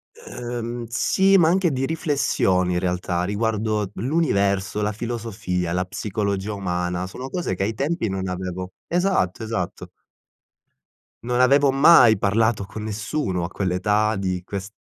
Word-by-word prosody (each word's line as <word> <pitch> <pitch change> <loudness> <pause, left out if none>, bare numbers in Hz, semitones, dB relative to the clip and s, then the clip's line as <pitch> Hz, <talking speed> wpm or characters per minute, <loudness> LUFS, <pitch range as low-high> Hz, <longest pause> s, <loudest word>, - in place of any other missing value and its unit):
Uhm, 120 -1 -6
sì, 195 - +3
ma 165 -3 +5
anche 180 -2 +2
di 130 0 -1
riflessioni, 135 - +1
in 90 - +1
realtà, 90 -1 -1
riguardo 105 0 -1
l'universo, 105 - 0
la 105 - 0
filosofia, 105 -6 -3
la 90 +1 0
psicologia 100 +1 -3
umana. 90 -2 -2
Sono 125 +8 -7
cose, 175 - -2
che 95 - -2
ai 110 - -1
tempi 140 - -1
non 95 -1 -3
avevo 90 0 -5
esatto, 175 - 0
esatto. 110 -6 -4 1.4
Non 125 0 0
avevo 140 +2 +5
mai 135 -5 +7
parlato 105 +1 +1
con 105 +2 -8
nessuno 105 - -2
a - - -2
quell'età, 105 +4 0
di 95 -2 -2
questo 100 +2 -6
105 Hz, 135 wpm, -23 LUFS, 95-125 Hz, 1.4 s, mai